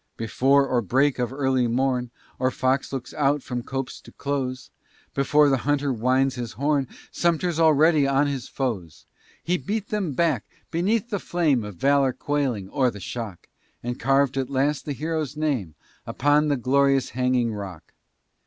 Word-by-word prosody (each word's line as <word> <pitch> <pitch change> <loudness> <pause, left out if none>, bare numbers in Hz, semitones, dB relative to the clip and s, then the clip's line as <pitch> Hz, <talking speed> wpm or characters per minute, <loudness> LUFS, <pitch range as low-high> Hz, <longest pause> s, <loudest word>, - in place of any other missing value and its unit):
Before 135 +5 +3
or 125 -2 +1
break 130 +6 +2
of 120 -1 -1
early 130 -2 +1
morn, 125 0 0 0.3
Or 130 0 +2
fox 130 +1 0
looks 135 -3 -5
out 145 -1 +1
from 125 -1 -4
copse 135 +1 -5
to - - -15
close, 130 -2 -3 0.4
Before 145 +2 +4
the 135 -1 +3
hunter 145 0 0
winds 130 +3 +2
his 120 -3 -5
horn. 140 +2 0 0.2
Sumter's 170 0 0
already 155 -2 +5
on 140 +1 +3
his 140 -3 -3
foes! 100 - -4 0.4
He 180 +1 0
beat 210 0 -3
them 200 -8 -1
back! 150 -6 +1 0.3
beneath 205 +8 0
the 205 - -1
flame 155 -11 +1
Of 105 -2 -7
valor 135 +5 +3
quailing, 135 -10 -1
or 130 +2 +2
the 105 - -8
shock! 105 -2 -6 0.4
And 120 +1 -4
carved, 135 0 +2
at 135 -1 -1
last, 140 +2 0
a 145 - -1
hero's 155 0 -3
name 130 - -1 0.3
Upon 145 +3 +2
the 145 -2 +1
glorious 135 +1 +2
Hanging 125 -2 +1
Rock! 95 -6 -8
135 Hz, 160 wpm, -24 LUFS, 125-145 Hz, 0.4 s, already